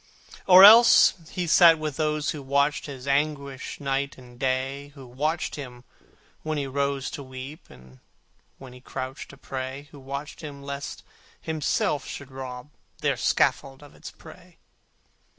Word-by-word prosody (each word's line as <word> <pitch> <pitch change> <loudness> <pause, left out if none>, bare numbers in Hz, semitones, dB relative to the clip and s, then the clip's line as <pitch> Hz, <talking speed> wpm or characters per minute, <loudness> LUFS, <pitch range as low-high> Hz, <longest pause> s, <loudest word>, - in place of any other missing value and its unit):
Or 185 0 +9
else 225 +4 +9 0.2
he 180 - -3
sat 170 0 +6
with 155 -2 -4
those 150 -1 -1
who 150 - -7
watched 140 +2 0
His 135 -3 -9
anguish 140 -1 -2
night 140 0 -2
and 125 -1 -15
day; 135 +2 -2
Who 135 -2 -12
watched 150 +8 -3
him 125 -4 -9 0.6
when 155 -1 -3
he 140 - -2
rose 140 0 -2
to - - -7
weep, 130 +4 -10
And 65 0 -17 0.6
when 130 -2 -12
he 125 - -14
crouched 130 +1 -7
to 140 - -13
pray; 135 +1 -7
Who 145 - -13
watched 140 +4 -7
him 145 -3 -9
lest 140 0 -7 0.4
himself 155 -2 -1
should 140 -1 -8
rob 130 +1 -8 0.3
Their - - +1
scaffold 135 +1 0
of 145 - -15
its - - -10
prey. - - -16
140 Hz, 150 wpm, -25 LUFS, 130-150 Hz, 0.6 s, Or